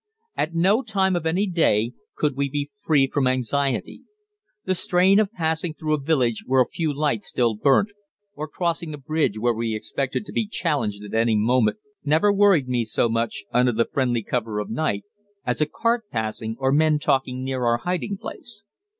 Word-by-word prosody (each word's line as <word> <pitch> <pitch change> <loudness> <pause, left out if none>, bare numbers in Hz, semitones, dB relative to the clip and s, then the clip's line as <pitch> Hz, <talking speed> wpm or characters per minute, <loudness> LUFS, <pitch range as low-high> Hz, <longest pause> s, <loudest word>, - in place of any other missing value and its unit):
At 165 +2 -2
no 195 +8 +3
time 195 -5 +1
of 165 -2 -1
any 180 +5 +1
day 125 - +2 0.2
could 150 -3 0
we 140 0 -1
be 145 +1 -3
free 155 -9 +3
from 135 0 0
anxiety. 130 +2 -1 0.6
The 185 - +1
strain 190 +1 +3
of 215 -2 +1
passing 160 -4 -2
through 155 -1 -2
a 155 - +1
village 130 -6 +1
where 130 0 +3
a 125 - +5
few 160 +4 -2
lights 140 -8 -1
still 120 -2 +1
burnt, 140 - +3 0.4
or 155 -5 -5
crossing 165 -1 -2
a - - -11
bridge 145 -5 -1
where 120 +2 +1
we 115 0 -2
expected 135 - -3
to - - -9
be 225 - -1
challenged 145 - -1
at 105 - -9
any 115 0 +2
moment, 110 - +2 0.3
never 160 +8 +3
worried 195 -9 +4
me 125 -2 0
so 115 +1 0
much, 115 -2 -1
under 125 0 +4
the 115 +1 +2
friendly 125 -4 0
cover 110 -2 -2
of 105 - -3
night, 110 -6 -1 0.4
as 125 +3 -1
a 150 - +3
cart 230 +7 0
passing 110 0 -3
or 135 0 +1
men 155 +1 +3
talking 130 -3 0
near 130 -1 -2
our 120 0 +3
hiding 180 - -2
place. 225 +2 -7
140 Hz, 190 wpm, -23 LUFS, 120-170 Hz, 0.6 s, a